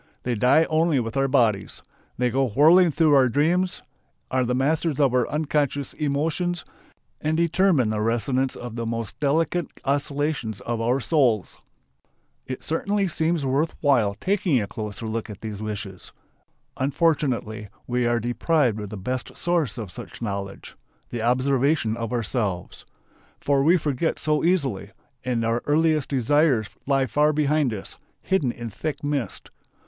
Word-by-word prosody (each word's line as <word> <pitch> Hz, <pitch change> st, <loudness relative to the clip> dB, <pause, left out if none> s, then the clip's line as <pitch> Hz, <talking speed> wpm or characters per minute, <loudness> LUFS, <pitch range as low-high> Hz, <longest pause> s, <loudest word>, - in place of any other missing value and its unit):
They 125 Hz, -, -1 dB
die 125 Hz, +8 st, +4 dB
only 160 Hz, -2 st, +2 dB
with 115 Hz, 0 st, -4 dB
our 135 Hz, 0 st, +2 dB
bodies. 115 Hz, -7 st, +1 dB, 0.3 s
They 125 Hz, 0 st, +1 dB
go 135 Hz, +2 st, +1 dB
whirling 160 Hz, -, +5 dB
through 155 Hz, 0 st, +3 dB
our 130 Hz, -3 st, +5 dB
dreams, 170 Hz, +8 st, +1 dB, 0.5 s
are 130 Hz, 0 st, +2 dB
the 125 Hz, 0 st, 0 dB
masters 150 Hz, +3 st, 0 dB
of 135 Hz, -4 st, +3 dB
our 125 Hz, -2 st, +2 dB
unconscious 145 Hz, -2 st, -1 dB
emotions, 160 Hz, +3 st, -1 dB, 0.6 s
and 155 Hz, +1 st, 0 dB
determine 170 Hz, -, +3 dB
the 110 Hz, -1 st, -1 dB
resonance 120 Hz, +4 st, 0 dB
of 120 Hz, -2 st, -7 dB
the 115 Hz, -1 st, -3 dB
most 115 Hz, -2 st, -4 dB
delicate 160 Hz, +3 st, +1 dB, 0.2 s
oscillations 140 Hz, -5 st, -1 dB
of 115 Hz, -1 st, -3 dB
our 120 Hz, +4 st, +1 dB
souls. 125 Hz, -, +1 dB, 0.9 s
It 130 Hz, -, -6 dB
certainly 200 Hz, +5 st, 0 dB
seems 160 Hz, -2 st, 0 dB
worth 140 Hz, +5 st, 0 dB
while 120 Hz, -9 st, +3 dB
taking 185 Hz, -, +1 dB
a 105 Hz, -, -1 dB
closer 105 Hz, +2 st, -6 dB
look 110 Hz, +1 st, -3 dB
at 105 Hz, -, -9 dB
these 110 Hz, -2 st, -6 dB
wishes. 105 Hz, -3 st, -6 dB, 0.7 s
Unfortunately 130 Hz, -6 st, 0 dB, 0.2 s
we 125 Hz, -1 st, 0 dB
are 120 Hz, 0 st, +2 dB
deprived 120 Hz, +1 st, +1 dB
of 105 Hz, -2 st, -6 dB
the 105 Hz, -, -7 dB
best 125 Hz, +6 st, -4 dB
source 170 Hz, -7 st, 0 dB
of 105 Hz, -6 st, -6 dB
such -, -, -9 dB
knowledge: 100 Hz, -3 st, -5 dB, 0.4 s
the 120 Hz, -, -3 dB
observation 130 Hz, 0 st, +1 dB
of 115 Hz, 0 st, -4 dB
ourselves. 105 Hz, -6 st, -3 dB, 0.5 s
For 140 Hz, -1 st, +2 dB
we 165 Hz, +6 st, +5 dB
forget 150 Hz, 0 st, -1 dB
so 150 Hz, -1 st, 0 dB
easily, 145 Hz, -, 0 dB, 0.3 s
and 120 Hz, -2 st, -1 dB
our 115 Hz, +1 st, 0 dB
earliest 155 Hz, -1 st, +2 dB
desires 135 Hz, -3 st, +2 dB, 0.2 s
lie 135 Hz, -1 st, +2 dB
far 150 Hz, +4 st, +2 dB
behind 150 Hz, -2 st, +1 dB
us, 105 Hz, -3 st, -7 dB, 0.3 s
hidden 190 Hz, -10 st, +1 dB
in 120 Hz, -1 st, -7 dB
thick 155 Hz, +9 st, -4 dB
mist. 145 Hz, -4 st, -3 dB
135 Hz, 150 wpm, -24 LUFS, 115-155 Hz, 0.9 s, whirling